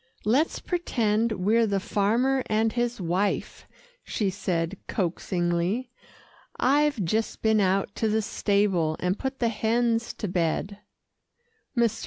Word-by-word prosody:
"Let's 265 +10 +2
pretend 230 - 0
we're 220 +4 +2
the 200 -1 0
farmer 230 +8 +1
and 220 +1 +1
his 240 -1 -1
wife," 185 +3 -1 0.4
she 200 -3 -1
said 180 -1 -2
coaxingly. 180 +5 -1 0.7
"I've 280 -5 +2
just 220 +6 -1
been 220 -1 +4
out 195 0 +1
to 220 - +1
the 220 +1 +1
stable, 200 -7 +1
and 180 +2 -1
put 265 0 -3
the 235 -3 +1
hens 230 +1 0
to 210 - -4
bed." 180 +3 -1 1.0
Mr. 230 -2 +2
215 Hz, 125 wpm, -26 LUFS, 190-235 Hz, 1.0 s, been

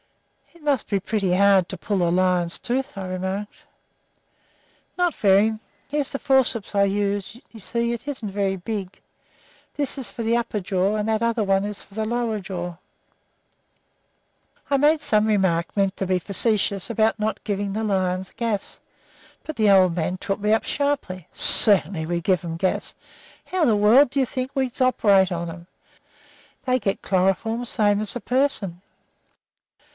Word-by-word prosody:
"It 335 - -19
must 285 -5 0
be 200 - +1
pretty 195 -2 -1
hard 195 -2 +4
to 190 - -5
pull 180 0 -1
a - - +1
lion's 180 -1 +1
tooth," 265 +4 -2
I 190 - -4
remarked. 190 +3 -5 1.3
"Not 355 -2 +1
very. 210 +2 +3 0.3
Here's 290 -1 -2
the 275 - -3
forceps 255 -6 +1
I 200 - +4
use; 200 +2 -1
you 225 - -12
see 235 +3 -2
it 235 +4 -7
isn't 260 -7 -4
very 195 -1 -1
big. 195 0 -6 0.8
This 285 -1 -2
is 260 - -4
for 235 - -7
the 225 +1 +1
upper 230 -3 -2
jaw, 190 +2 0
and 210 0 -2
that 220 0 0
other 230 -1 +1
one 195 0 +1
is 205 -1 -6
for 195 - -19
the 220 0 -1
lower 230 -1 -1
jaw." 180 -3 -6 1.9
I 280 - +3
made 300 +2 +3
some 215 -7 +2
remark, 190 -6 +1
meant 195 -1 +1
to 195 - -2
be 185 0 +1
facetious, 200 +1 +1
about 220 0 +1
not 215 +1 -2
giving 200 -1 -2
lions 190 -4 -1
gas, 225 -4 -3 0.6
but 310 - -6
the 215 -2 +3
old 185 -3 +5
man 180 +2 -2
took 195 +2 -3
me 210 +1 0
up 220 - +3
sharply. 280 - -2
"Certainly 185 -5 +4
we 170 0 -1
give 185 +1 +1
'em 165 -1 -5
gas. 185 +2 -1 0.5
How 370 - -4
else - - +3
in 285 - +4
the 215 - +3
world 225 +7 +5
do 275 - -1
you 265 - +3
think 255 +2 -4
we 265 -2 0
operate 200 -7 +3
on 170 -1 -3
'em? 170 +1 -10 1.0
They 255 0 +2
get 195 -3 -2
chloroform 195 +5 0
same 205 -2 +2
as 215 - -1
a - - -2
person. 245 -10 0
205 Hz, 170 wpm, -23 LUFS, 190-235 Hz, 1.9 s, old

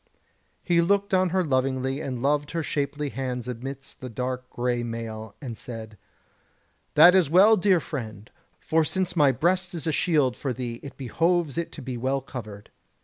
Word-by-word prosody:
He 170 -2 +3
looked 200 +3 +1
on 185 -1 +3
her 185 +1 +1
lovingly 130 0 0
and 130 -4 -4
loved 145 +1 +1
her 165 -1 -1
shapely 145 0 -2
hands 125 -3 -4
amidst 135 +3 -7
the 130 - -6
dark 125 +2 -4
grey 120 0 -1
mail, 115 -2 -6
and 125 -5 -6
said: 110 -2 -8 1.0
"That 180 - +9
is 185 -6 +4
well, 195 +7 +7
dear 190 -2 +3
friend, 110 -9 -6 0.3
for 160 0 +2
since 185 +3 -1
my 145 -4 +5
breast 180 +7 0
is 160 - -4
a 160 - +1
shield 145 -5 +2
for 135 -3 -3
thee 120 -1 -5
it 135 -2 -10
behoves 165 +3 0
it 170 0 -3
to 145 - -8
be 125 -1 -4
well 130 +3 0
covered." 110 -6 -9
135 Hz, 175 wpm, -26 LUFS, 125-170 Hz, 1.0 s, That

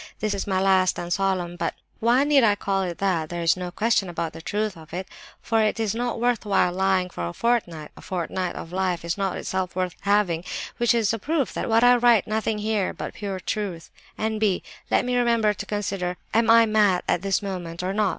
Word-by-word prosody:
This 215 -1 -1
is 200 - -3
my 190 -1 +1
'last 190 -1 +3
and 175 0 -2
solemn'—but 175 -3 -1 0.2
why 240 +4 +4
need 290 -2 +4
I 210 -2 +4
call 195 -1 -1
it 175 -2 -3
that? 175 -6 0
There 175 -1 -4
is 165 - +4
no 180 -1 -5
question 205 0 +1
about 170 -2 -3
the - - -9
truth 210 +3 -2
of 160 0 -11
it, 185 +1 -4 0.4
for 225 -1 +2
it 215 +1 +1
is 220 -3 0
not 240 +1 -2
worthwhile 215 -6 +2
lying 190 -1 +1
for 85 - -4
a 85 - -6
fortnight; 175 -11 -1
a - - -13
fortnight 180 0 -3
of 165 - -7
life 180 -2 -1
is 170 - -1
not 195 -2 -2
itself 185 -1 -3
worth 185 -2 -2
having, 200 -5 +1 0.3
which 240 0 +3
is 225 -2 +2
a 225 - -2
proof 285 +1 -1
that - - -3
I 245 0 +7
write 235 -4 +4
nothing 220 0 -1
here 210 -2 -1
but - - -6
pure 200 -3 -5
truth. 185 -5 -4 0.3
("N.B.—Let 215 -1 -1
me 250 0 0
remember 235 -3 +3
to - - -7
consider; 195 -3 -2 0.2
am 225 +1 +3
I 230 0 +7
mad 210 -4 +3
at 175 - +1
this 195 0 0
moment, 180 -3 -5
or 185 +1 -1
not? 210 -1 +2
195 Hz, 210 wpm, -24 LUFS, 180-220 Hz, 0.4 s, I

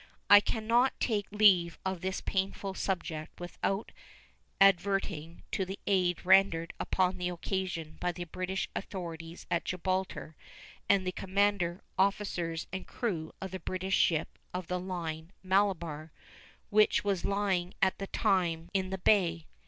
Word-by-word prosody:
I 205 - +12
can 215 +1 -3
not 240 +4 +3
take 210 -4 0
leave 190 -5 +5
of 190 -2 -2
this 190 0 -2
painful 195 0 -2
subject 175 -5 -3
without 195 +3 -3 0.7
adverting 195 -4 +2
to 190 - 0
the 190 +2 -5
aid 180 -3 +1
rendered 185 -3 +4
upon 185 0 +1
the 180 0 -1
occasion 175 -3 -3
by 180 - 0
the 175 0 -6
British 185 +3 -3
authorities 170 -3 -6
at 170 - +1
Gibraltar 185 -3 -2 0.5
and 195 -2 +4
the 185 - 0
commander, 190 -2 0 0.2
officers, 190 -4 0
and 190 - -5
crew 175 -10 -3
of 190 -1 -6
the 190 - -5
British 185 +2 -3
ship 160 -2 +1 0.2
of 180 -1 -3
the 180 +2 -2
line 170 -2 -5
the 185 - -14
Malabar, 170 -6 +1 0.6
which 215 0 +4
was 200 -3 0
lying 195 -3 0
at 190 -1 +2
the 195 - -4
time 175 -7 0
in 190 -1 0
the 190 - -3
bay. 175 -4 +2
185 Hz, 145 wpm, -31 LUFS, 170-195 Hz, 0.7 s, I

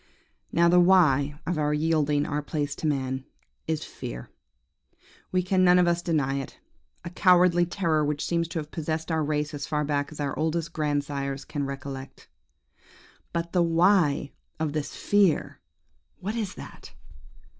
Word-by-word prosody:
"Now, 170 0 +4
the 175 +1 +5
WHY 150 -6 +4
of 175 -2 -1
our 150 0 +1
yielding 150 -2 +1
our 150 0 -2
place 145 -1 -3
to 155 - -2
man 130 -2 -1 0.4
is 160 -1 -1
fear. - - -8 1.0
We 185 -1 +1
can 185 +1 +2
none 180 0 +6
of 180 -1 +4
us 170 0 +1
deny 145 -6 0
it: 135 - -8 0.5
a 170 - -5
cowardly 180 -2 +4
terror 165 -4 +1
which 145 0 -1
seems 170 -1 0
to 165 - -6
have 150 -1 -5
possessed 160 +1 -3
our 160 -1 +1
race 150 0 -1
as 145 -1 -5
far 150 -1 0
back 145 0 -1
as 155 - -10
our 140 -2 -2
oldest 165 +1 -1
grandsires 140 -2 -2
can 145 -2 -3
recollect. 135 0 -7 1.0
"But 170 0 -3
the 180 - +2
WHY 165 -4 +3 0.3
of 155 -2 -1
this 150 -2 -3
fear? 200 -6 +2 0.6
What 200 +4 -3
is 215 -5 -3
that? - - -11
155 Hz, 160 wpm, -26 LUFS, 145-170 Hz, 1.0 s, none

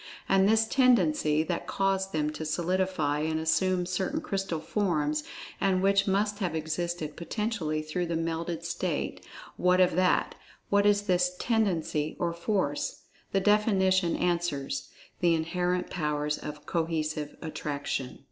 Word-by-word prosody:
And 195 +1 +4
this 220 0 +4
"tendency" 175 - +3
that 170 +1 -3
caused 195 0 0
them 150 -2 0
to 155 +1 -6
solidify, 170 -2 0
and 160 +1 0
assume 180 +3 +1
certain 185 - -1
crystal 195 - -2
forms, 155 -4 0 0.4
and 190 -1 +2
which 195 +1 +3
must 205 +2 +1
have 180 -5 -1
existed 160 0 -3
potentially 170 -5 -2
through 170 +3 -2
the 165 - -2
melted 165 0 -2
state—what 180 +1 -2
of 180 -2 +4
that, 185 0 +2 0.4
what 200 0 +4
is 205 0 +3
this 180 -2 +1
"tendency" 175 -10 0
or 170 -1 -1
force. 170 -4 -1 0.3
The 195 - +2
definition 190 -4 +3
answers: 145 -6 -1 0.3
"the 170 -2 +4
inherent 180 +2 -1
powers 150 -3 -1
of 150 0 -8
cohesive 155 -3 -2
attraction." 145 -4 -4
175 Hz, 130 wpm, -28 LUFS, 155-190 Hz, 0.4 s, And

